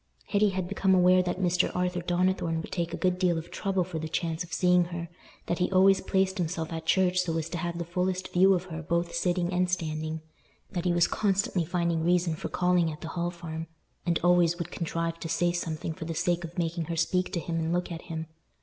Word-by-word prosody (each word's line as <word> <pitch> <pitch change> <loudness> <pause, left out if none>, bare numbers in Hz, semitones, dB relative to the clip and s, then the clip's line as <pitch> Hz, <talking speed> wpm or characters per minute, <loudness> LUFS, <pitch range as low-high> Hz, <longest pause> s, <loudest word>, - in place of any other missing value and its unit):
Hetty 205 0 +3
had 185 -2 -2
become 190 0 +2
aware 185 0 +5
that 180 0 -2
Mr. 180 -1 +2
Arthur 180 0 0
Donnithorne 175 -1 +1
would - - -9
take 170 -2 -2
a - - -3
good 180 -1 +1
deal 180 -3 +2
of 165 +1 -6
trouble 195 -2 0
for 170 -2 -5
the 160 0 -4
chance 165 +1 -1
of 170 - -13
seeing 180 -1 +4
her; 170 -1 -6 0.4
that 175 - -1
he 180 - +1
always 190 +1 +5
placed 190 0 +1
himself 165 -1 -2
at 160 0 -5
church 185 0 +3
so 170 -3 0
as 160 -1 -2
to 175 - -4
have 170 0 -3
the 170 - -3
fullest 180 +2 -2
view 190 +2 +6
of 175 - -2
her 165 -3 -6
both 170 +1 -1
sitting 175 +1 0
and 180 0 +2
standing; 155 -2 -2 0.5
that 175 -1 -3
he 180 - +3
was 175 0 +4
constantly 195 -4 +1
finding 170 -1 0
reason 175 -1 +2
for 160 - -5
calling 180 -2 +2
at 150 - -9
the 160 - -5
Hall 175 0 -1
Farm, 165 -2 -6 0.4
and 170 -1 +1
always 175 -1 +4
would 170 - -5
contrive 165 0 -2
to 165 - -5
say 175 +1 +2
something 165 -2 -3
for 160 0 -7
the 165 0 -4
sake 175 +1 0
of 170 +1 -8
making 170 -1 -1
her 170 +1 -3
speak 180 +3 +1
to 170 - 0
him 165 +1 -3
and 160 0 -1
look 180 0 -1
at 165 0 -5
him. 160 -1 -3
175 Hz, 235 wpm, -28 LUFS, 165-180 Hz, 0.5 s, view